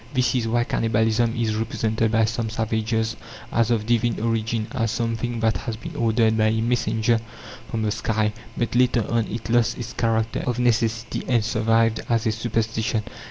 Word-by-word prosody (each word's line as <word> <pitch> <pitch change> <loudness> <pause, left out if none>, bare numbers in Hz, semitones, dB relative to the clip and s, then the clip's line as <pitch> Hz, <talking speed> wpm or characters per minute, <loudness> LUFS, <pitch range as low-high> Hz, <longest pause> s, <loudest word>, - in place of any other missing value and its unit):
This 125 -1 +2
is 120 -3 0
why 120 +1 +2
cannibalism 115 +1 +1
is 115 -2 0
represented 110 0 0
by 115 0 +3
some 115 0 -2
savages 110 0 -1 0.4
as 115 -2 +2
of 115 -3 +1
divine 120 0 +1
origin, 115 0 -1
as 115 -4 0
something 115 0 -2
that 110 -3 +2
has 115 +1 -4
been 115 - -8
ordered 110 -1 +2
by 110 - +4
a 110 +1 +1
messenger 115 0 +1 0.5
from 110 -1 -2
the 105 - 0
sky. 110 -1 0 0.2
But 120 - -1
later 120 -3 +3
on 115 -1 0
it 115 0 -5
lost 120 -1 +2
its 120 0 -6
character 115 -1 0
of 125 -1 0
necessity, 115 -1 0
and 120 -4 +2
survived 115 0 +2
as 115 -2 +1
a 110 - +2
superstition. 110 -1 -1
115 Hz, 175 wpm, -23 LUFS, 110-120 Hz, 0.5 s, by